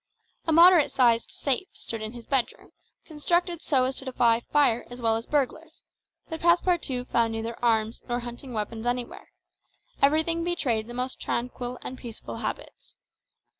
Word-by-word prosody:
A - - +2
moderate 340 -1 +7
sized 235 -4 +3
safe 285 +7 -1
stood 225 -1 -5
in 220 +1 -5
his 240 -2 -10
bedroom, 265 -3 -2 0.3
constructed 345 +2 0
so 265 -4 +2
as 260 +1 -1
to 270 - -5
defy 235 -3 +3
fire 240 -2 +2
as 245 0 -9
well 225 -2 +2
as 225 +1 -4
burglars; 300 +3 -2 0.4
but 320 0 -6
Passepartout 340 -7 +2
found 230 -1 +2
neither 225 +1 -5
arms 225 -1 +1
nor 240 0 -1
hunting 240 +2 -8
weapons 225 +1 -4
anywhere; 245 0 -3 0.7
everything 320 +4 +3
betrayed 255 -11 -1
the 240 - -8
most 255 +1 -3
tranquil 245 +1 -3
and 260 - -6
peaceable 230 -3 -8
habits. - - -6
250 Hz, 155 wpm, -26 LUFS, 235-310 Hz, 0.7 s, moderate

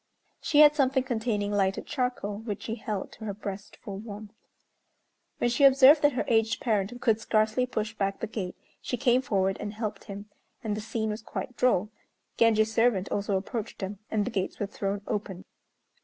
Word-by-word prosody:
She 295 -1 +4
had 300 0 +8
something 265 -2 +2
containing 220 -5 -1
lighted 195 -1 0
charcoal 250 -7 -2
which 215 -2 -5
she 225 - -3
held 210 -4 -4
to 220 - -10
her 200 -2 -4
breast 200 -1 -7
for 195 -2 -7
warmth. 210 0 -9 1.0
When 240 - +1
she 260 +4 +1
observed 275 +2 +8
that 290 -1 +4
her 250 - -1
aged 225 -1 +2
parent 220 0 -1
could 225 -2 +2
scarcely 220 +3 +1
push 215 -3 -3
back 195 -2 -2
the - - -2
gate, 200 -5 -5 0.3
she 245 - -3
came 250 -1 +3
forward 195 -6 0
and 205 0 -5
helped 215 -1 -4
him. 200 -1 -7 0.4
And 215 -2 -1
the 215 - -4
scene 220 0 -2
was 210 +1 -5
quite 250 +2 -6
droll. 215 -5 +2 0.4
Genji's 220 -1 +3
servant 225 -4 +2
also 200 -1 0
approached 215 +3 -5
them, 195 +1 -5
and 210 -2 0
the 250 - -3
gates 190 -3 -2
were 205 - 0
thrown 195 0 -3
open. 195 -3 -4
215 Hz, 185 wpm, -28 LUFS, 205-245 Hz, 1.0 s, had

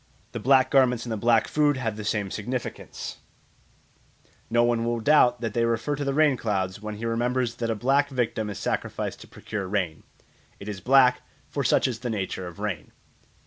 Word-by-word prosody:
The - - -5
black 130 0 +4
garments 125 -3 +3
and 120 - -5
the - - 0
black 115 +1 +3
food 145 -2 +2
have 115 -5 -2
the 110 - -6
same 105 -2 -1
significance; 120 +4 -5 1.3
no 120 +1 +3
one 120 -1 +1
will 120 0 -1
doubt 125 -2 +4
that 115 -3 -3
they 115 - +1
refer 115 +5 0
to 145 - -4
the 140 -1 -1
rain 150 -3 +4
clouds 95 -3 -2
when 105 0 -5
he 110 +3 -6
remembers 120 +1 0
that 115 -1 -2
a 115 - 0
black 135 +6 +2
victim 115 -5 -1
is 100 - -5
sacrificed - - -3
to - - -12
procure 100 -3 -6
rain; 90 -6 -2 0.6
'it 100 - -9
is 100 -3 -5
black, 125 +2 +5 0.3
for 140 - -1
such 135 - +3
is 120 -3 -4
the 125 - -4
nature 95 -4 -3
of 85 - -10
rain.' 100 -6 -4
115 Hz, 195 wpm, -26 LUFS, 105-130 Hz, 1.3 s, black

